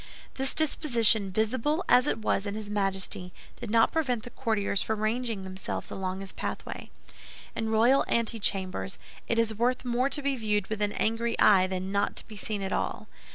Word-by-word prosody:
This 270 Hz, 0 st, +1 dB
disposition, 235 Hz, -9 st, +4 dB
visible 255 Hz, -, 0 dB
as 250 Hz, +3 st, +5 dB
it -, -, 0 dB
was 210 Hz, -2 st, -1 dB
in 200 Hz, -, -3 dB
his 210 Hz, -1 st, -6 dB
Majesty, 195 Hz, -3 st, -1 dB, 0.3 s
did 235 Hz, -, -6 dB
not 225 Hz, +1 st, +4 dB
prevent 255 Hz, -8 st, -1 dB
the 245 Hz, -, -9 dB
courtiers 205 Hz, -3 st, -1 dB
from 220 Hz, -1 st, -2 dB
ranging 225 Hz, -2 st, -1 dB
themselves 190 Hz, 0 st, -6 dB
along 190 Hz, 0 st, -4 dB
his 195 Hz, -, -7 dB
pathway. -, -, -6 dB, 0.7 s
In 225 Hz, -1 st, -2 dB
royal 235 Hz, +5 st, +4 dB
antechambers 200 Hz, -5 st, +1 dB, 0.3 s
it 230 Hz, -, 0 dB
is 230 Hz, -1 st, +2 dB
worth 245 Hz, +4 st, 0 dB
more 250 Hz, +2 st, +1 dB
to 290 Hz, 0 st, -2 dB
be 280 Hz, -1 st, +1 dB
viewed 210 Hz, -4 st, 0 dB
with 215 Hz, -1 st, -3 dB
an 205 Hz, 0 st, 0 dB
angry 230 Hz, +1 st, -1 dB
eye 190 Hz, -3 st, +6 dB
than 185 Hz, 0 st, -4 dB
not 200 Hz, 0 st, 0 dB
to -, -, -4 dB
be 215 Hz, -, -10 dB
seen 205 Hz, 0 st, -3 dB
at 190 Hz, -, -3 dB
all. -, -, -3 dB
220 Hz, 185 wpm, -28 LUFS, 200-240 Hz, 0.7 s, eye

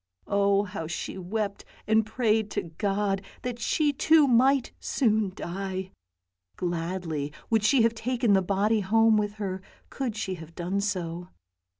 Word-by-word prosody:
Oh 200 Hz, 0 st, +2 dB
how 185 Hz, -5 st, -5 dB
she 165 Hz, -, -4 dB
wept 200 Hz, +2 st, -3 dB, 0.2 s
and 220 Hz, +1 st, +3 dB
prayed 220 Hz, -1 st, +1 dB
to -, -, +1 dB
God, 195 Hz, +3 st, -1 dB, 0.2 s
that 245 Hz, -1 st, -4 dB
she 295 Hz, +3 st, +1 dB
too 315 Hz, +2 st, +5 dB
might 260 Hz, +2 st, +4 dB
soon 220 Hz, -6 st, +1 dB
die. 190 Hz, +1 st, -4 dB, 0.6 s
Gladly 170 Hz, -4 st, -3 dB, 0.2 s
would 220 Hz, -2 st, +3 dB
she 235 Hz, +2 st, +4 dB
have 230 Hz, 0 st, +3 dB
taken 235 Hz, -1 st, +1 dB
the 190 Hz, -, +5 dB
body 200 Hz, +4 st, +1 dB
home 225 Hz, +3 st, +4 dB
with 205 Hz, -1 st, 0 dB
her 195 Hz, -3 st, -4 dB, 0.3 s
could 255 Hz, -6 st, -3 dB
she 200 Hz, -3 st, -3 dB
have 160 Hz, +1 st, -12 dB
done 185 Hz, +3 st, -1 dB
so. 175 Hz, -4 st, -3 dB
205 Hz, 150 wpm, -27 LUFS, 185-225 Hz, 0.6 s, too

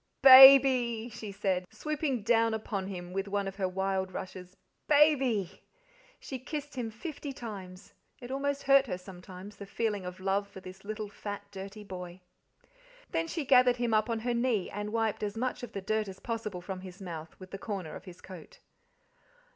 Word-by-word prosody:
"BABY!" 260 Hz, -3 st, +9 dB
she 215 Hz, -2 st, -8 dB
said, 190 Hz, -2 st, -1 dB
swooping 285 Hz, 0 st, -3 dB
down 225 Hz, 0 st, +3 dB
upon 200 Hz, -3 st, -4 dB
him 180 Hz, -2 st, -7 dB
with 195 Hz, +1 st, -2 dB
one 200 Hz, 0 st, -1 dB
of 195 Hz, 0 st, -6 dB
her 190 Hz, -2 st, 0 dB
wild 190 Hz, 0 st, -2 dB
rushes. 185 Hz, 0 st, -8 dB, 0.3 s
"BABY!" 265 Hz, -, +3 dB, 0.6 s
She 265 Hz, -, -7 dB
kissed 290 Hz, +2 st, -6 dB
him 245 Hz, -3 st, -3 dB
fifty 290 Hz, +5 st, -7 dB
times; 200 Hz, -7 st, -9 dB, 0.3 s
it 245 Hz, 0 st, -9 dB
almost 280 Hz, +1 st, -2 dB
hurt 275 Hz, 0 st, +5 dB
her 180 Hz, -, -3 dB
sometimes, 185 Hz, +2 st, -11 dB
the 200 Hz, -, -9 dB
feeling 210 Hz, -1 st, -2 dB
of 180 Hz, 0 st, -7 dB
love 195 Hz, +1 st, 0 dB
for 195 Hz, -, -11 dB
this 185 Hz, +1 st, -12 dB
little 215 Hz, +1 st, -5 dB
fat, 205 Hz, 0 st, -7 dB
dirty 200 Hz, +2 st, -8 dB
boy. 180 Hz, -2 st, -8 dB, 0.9 s
Then 330 Hz, 0 st, -1 dB
she 320 Hz, -3 st, -3 dB
gathered 250 Hz, -2 st, +5 dB
him 240 Hz, -2 st, -1 dB
up 215 Hz, +1 st, +2 dB
on 225 Hz, -1 st, -1 dB
her 245 Hz, +1 st, -1 dB
knee 235 Hz, -5 st, 0 dB
and 205 Hz, +1 st, -4 dB
wiped 225 Hz, -1 st, -1 dB
as 210 Hz, +1 st, -3 dB
much 255 Hz, +2 st, -2 dB
of 245 Hz, -2 st, -8 dB
the 195 Hz, -, -4 dB
dirt 215 Hz, +2 st, -1 dB
as 190 Hz, -1 st, -9 dB
possible 220 Hz, -6 st, -4 dB
from 185 Hz, +1 st, -6 dB
his 185 Hz, 0 st, -11 dB
mouth 165 Hz, -4 st, -8 dB
with 185 Hz, -1 st, -12 dB
the 195 Hz, -, -6 dB
corner 195 Hz, -8 st, -5 dB
of -, -, -10 dB
his 180 Hz, -2 st, -12 dB
coat. 180 Hz, -4 st, -12 dB
210 Hz, 185 wpm, -30 LUFS, 190-245 Hz, 0.9 s, BABY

